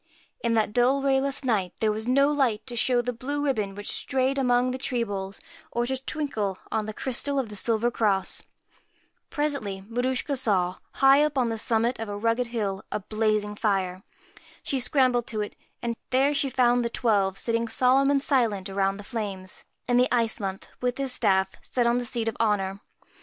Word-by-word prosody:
In 230 -1 +2
that 215 -1 +1
dull 255 +4 +3
rayless 275 0 +1
night 205 -8 0
there 220 -1 +2
was 220 +2 -2
no 275 +3 +4
light 260 -7 +1
to 245 -2 -6
show 245 +1 +2
the 245 +1 -2
blue 285 +5 -3
ribbon, 210 -8 -1
which 205 0 -5
strayed 270 0 0
among 250 -1 +2
the 260 - -4
tree 250 -3 0
boles, 195 -2 -5 0.3
or 240 0 -1
to 265 +2 -1
twinkle 260 -8 -3
on 220 -1 -1
the - - -3
crystal 275 +2 -1
of 260 -5 -1
the 210 - -7
silver 230 +3 +1
cross. 205 -5 +1 0.9
Presently 280 -11 -2
Maruschka 250 +4 -1
saw, 185 -8 +2 0.2
high 275 +1 +6
up 300 -2 -1
on 245 -3 +2
the 225 - -2
summit 230 +2 +1
of 225 -2 -4
a 205 - -4
rugged 230 +3 0
hill, 205 -5 -3
a - - -1
blazing 215 0 0
fire. 190 -4 -1 0.6
She 270 - 0
scrambled 250 -2 +2
to 220 -4 -2
it, 210 - -5 0.3
and 235 -1 -1
there 270 +3 +3
she 280 -1 +2
found 245 -1 +3
the 235 - -1
Twelve 200 -5 +1
sitting 230 0 -1
solemn 260 +4 +3
and 280 -1 +2
silent 220 -9 +1
around 195 0 0
the 205 - -9
flames, 200 -4 -5 0.2
and 245 0 +3
the 250 - +3
Ice 230 -2 +2
Month, 195 -2 -4
with 250 0 -1
his 275 -2 -1
staff, 190 -3 +2
sat - - -19
still 245 -2 +1
on 240 +1 +2
the 245 - -3
seat 230 -1 -1
of 225 - -1
honour. 200 -3 0
235 Hz, 195 wpm, -26 LUFS, 210-260 Hz, 0.9 s, high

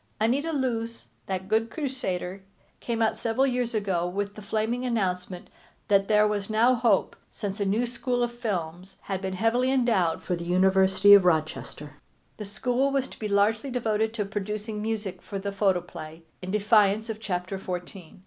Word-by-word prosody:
Anita 265 +9 +1
Loos, 230 -5 -2 0.2
that 190 -1 -3
good 220 +2 +1
crusader, 200 - -3 0.4
came 230 -1 -1
out 220 - +2
several 235 +4 +1
years 245 -3 -1
ago 190 -5 0
with 200 +2 -3
the 210 - -10
flaming 220 +4 -1
announcement 185 -6 -2 0.4
that 195 -1 +4
there 210 0 +4
was 205 -1 -2
now 225 +4 +4
hope, 230 -5 +2
since 200 0 -5
a 205 +4 +1
school 245 +1 -1
of 240 - -1
films 185 -4 -4
had 190 -1 -4
been 190 0 -3
heavily 230 +6 +2
endowed 225 -11 +1
for 180 - -1
the 170 - -6
University 190 +2 +5
of 200 -2 +8
Rochester. 150 -3 -1 0.4
The 210 - -6
school 250 +6 0
was 275 -1 0
to - - -13
be 215 - -2
largely 210 +5 +2
devoted 220 -3 0
to 210 -3 -1
producing 210 +1 -4
music 215 -3 -3
for 200 - -6
the 200 +1 -3
photoplay, 175 -5 -2 0.2
in 185 - -6
defiance 210 +1 +3
of 220 -2 -5
chapter 185 -2 -3
fourteen. 180 -1 -7
210 Hz, 170 wpm, -26 LUFS, 190-230 Hz, 0.4 s, of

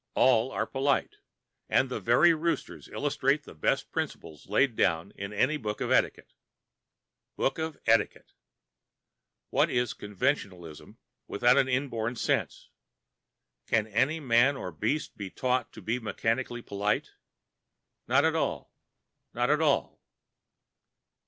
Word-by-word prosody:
All 125 -1 +4
are - - -1
polite, 140 - 0 0.5
and - - +3
the - - -4
very 175 -1 +5
roosters 165 +1 -3
illustrate 145 0 0
the - - -12
best 75 - -1
principles 80 -2 -5
laid 120 +3 +2
down 85 0 +1
in 100 +1 -6
any 130 +9 +1
book 105 -5 -4
of - - -2
etiquette. - - +1 1.0
Book 135 - -1
of 160 -1 -3
Etiquette! 115 0 +1 1.2
What - - +3
is 120 -2 0
conventionalism 95 - -3 0.3
without 125 +5 +4
the 130 - -7
inborn 125 -3 -1
sense? - - -2 1.0
Can 110 -2 +2
any 130 +9 +1
man 130 0 +3
or 90 - -5
beast 110 - -2
be 100 -2 -5
taught 125 +5 -1
to - - -11
be 115 +3 -1
mechanically 120 +2 -2
polite? 100 +1 -1 1.0
Not - - +4
at - - +2
all—not 120 +3 -4
at 150 +1 +2
all!... 145 -3 +1
120 Hz, 125 wpm, -28 LUFS, 105-140 Hz, 1.2 s, very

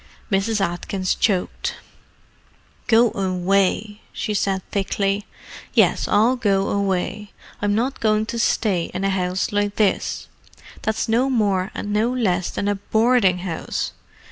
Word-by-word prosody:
Mrs. 205 +3 +1
Atkins 185 +1 -1
choked. 190 -5 -1 1.1
"Go 235 -1 +5
away!" 195 +2 0
she 215 - -3
said 195 -2 -1
thickly. 200 +1 -1 0.5
"Yes, - - +3
I'll 230 +5 +3
go 200 -5 +1
away. 200 +1 -1 0.3
I'm 205 0 +1
not 250 +5 -1
going 215 -1 +2
to 230 +1 -4
stay 195 -6 +1
in 185 - -2
a 195 - +2
house 185 0 -1
like 205 0 0
this, 210 -3 0 0.5
that's 220 +2 -1
no 240 +4 +2
more 200 -6 +1
and 205 - -4
no 220 +3 +2
less 190 -8 0
than 200 - -3
a 205 - +2
boarding 220 -2 +3
house! 165 -3 -3
205 Hz, 135 wpm, -22 LUFS, 190-220 Hz, 1.1 s, Go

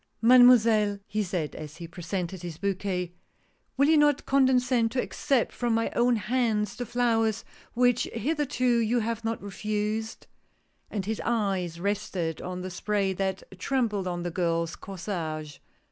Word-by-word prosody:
" - - -46
Mademoiselle," 230 -4 +6
he 215 +1 -2
said 175 -6 -2
as 155 +1 -8
he 170 -1 -7
presented 175 +1 -4
his 170 -3 -6
bouquet, 185 -2 -2 0.3
" - - -42
will 280 +2 +4
you 315 0 +5
not 295 -2 +3
condescend 255 -3 +3
to 250 - -2
accept 270 -1 0
from 240 -2 0
my 225 0 0
own 240 0 +3
hands 215 -2 0
the 245 -1 -5
flowers 225 -3 +1 0.3
which 245 0 +3
hitherto 285 +1 -2
you 230 +2 +1
have 230 +1 -3
not 225 0 -2
refused? 210 +2 -3 0.3
" - - -43
And 200 -4 -3
his 220 +1 -2
eyes 195 -7 -1
rested 185 -4 -2
on 180 0 -5
the 185 0 -5
spray 195 +1 0
that 190 0 -2 0.2
trembled 210 -4 0
on 175 -1 -3
the 175 - -3
girl's 170 -1 -1
corsage. 165 -6 -5
210 Hz, 160 wpm, -27 LUFS, 180-240 Hz, 0.3 s, Mademoiselle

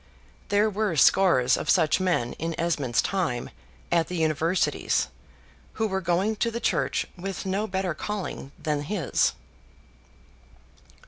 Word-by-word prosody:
There 205 +1 +3
were 210 -3 -1
scores 135 -6 +5
of - - -4
such 160 -1 +4
men 175 -10 0
in 165 +1 -2
Mr. 165 - -3
Esmond's 145 -8 +1
time 165 -11 -2 0.4
at 170 -1 +3
the 180 - -5
universities, 160 +2 +1 0.6
who 220 - -1
were 190 -2 -1
going 185 +5 0
to 230 - +1
the 230 +1 -4
church - - 0
with 195 +1 -5
no 195 +3 -1
better 190 -4 -1
calling 185 -5 -5
than 150 -2 -1
his. 160 -1 0
180 Hz, 135 wpm, -26 LUFS, 155-195 Hz, 0.6 s, scores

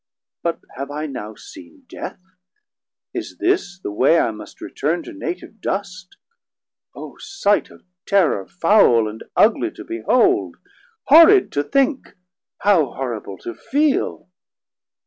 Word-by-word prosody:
But 170 -1 -2 0.2
have 140 +1 -5
I 150 +2 -4
now 110 -7 -7
seen 300 - -14
Death? 180 - -8 0.9
Is - - -6
this 275 - 0
the 145 - -5
way 130 +10 +3
I 115 - +2
must 110 - -12
return 165 +4 -2
to 345 - -10
native 295 - -7
dust? 190 -2 -5 0.8
O - - -10
sight 390 - 0
Of - - -18 0.2
terrour, 170 - +2
foul 165 - +4
and 110 +1 -8
ugly - - +3
to - - -10
behold, 250 - +1 0.5
Horrid 335 +6 +7
to 145 - 0
think, 275 - 0 0.5
how 170 -11 +3
horrible 115 -7 -5
to 115 - -4
feel! 290 - -1
185 Hz, 125 wpm, -20 LUFS, -, 0.9 s, Horrid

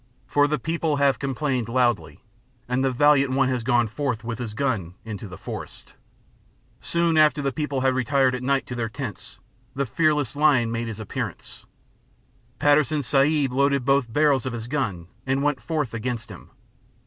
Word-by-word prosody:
For 145 +3 +3
the 150 +1 0
people 160 +2 -1
have 140 -1 +2
complained 135 -3 -2
loudly, 120 -3 0 0.5
and 125 +2 0
the 135 - +2
valiant 140 0 +4
one 135 -1 +2
has 125 -3 -1
gone 120 -1 +2
forth 125 0 -3
with 115 0 -5
his 115 -4 -5
gun 110 -10 -2
into 105 -1 -6
the 90 - -10
forest. - - -8 0.9
Soon 170 -1 +1
after 155 0 +4
the 140 -1 -1
people 145 -1 -2
had 130 0 +2
retired 130 +1 +2
at 125 - -3
night 135 +1 0
to - - -7
their 115 -2 -2
tents, 120 -2 -7 0.4
the 140 +1 0
fearless 150 0 +1
lion 140 -6 +3
made 115 0 -2
his 110 -1 -6
appearance; 110 - -6 0.9
Patterson 145 +1 +3
Sahib 140 +1 +2
loaded 140 -1 +2
both 135 -4 +2
barrels 145 -2 +2
of 130 - -3
his 115 -1 -5
gun 115 - -2 0.2
and 135 +1 +1
went 145 -2 0
forth 150 -7 -2
against 115 0 -4
him. 90 - -12
130 Hz, 170 wpm, -24 LUFS, 120-145 Hz, 0.9 s, valiant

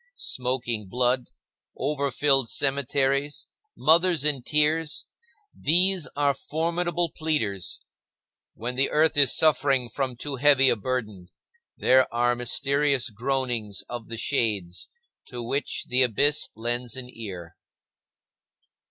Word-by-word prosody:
Smoking 125 -4 -2
blood, 125 +2 +1 0.5
over 140 +1 -1
filled 135 -2 +2
cemeteries, 140 +1 0 0.3
mothers 165 -1 +3
in 145 -4 +2
tears,—these 165 - 0
are 145 -1 +2
formidable 170 +4 -2
pleaders. 110 - -2 0.7
When 120 +3 -4
the 135 +2 +1
earth 155 +1 +2
is 145 -2 +5
suffering 140 -5 +2
from 130 +1 -3
too 140 +3 -6
heavy 135 -1 +5
a - - +3
burden, 105 -5 -4 0.5
there 130 0 +3
are 120 +1 +1
mysterious 135 +1 0
groanings 120 -4 -2
of 120 -2 -7
the 115 - -6
shades, 105 -8 -1 0.4
to 120 -1 -7
which 135 +5 -2
the 125 +1 +2
abyss 140 +5 +3
lends 120 +1 -2
an 130 -1 -6
ear. 95 -9 -9
135 Hz, 110 wpm, -25 LUFS, 120-145 Hz, 0.7 s, is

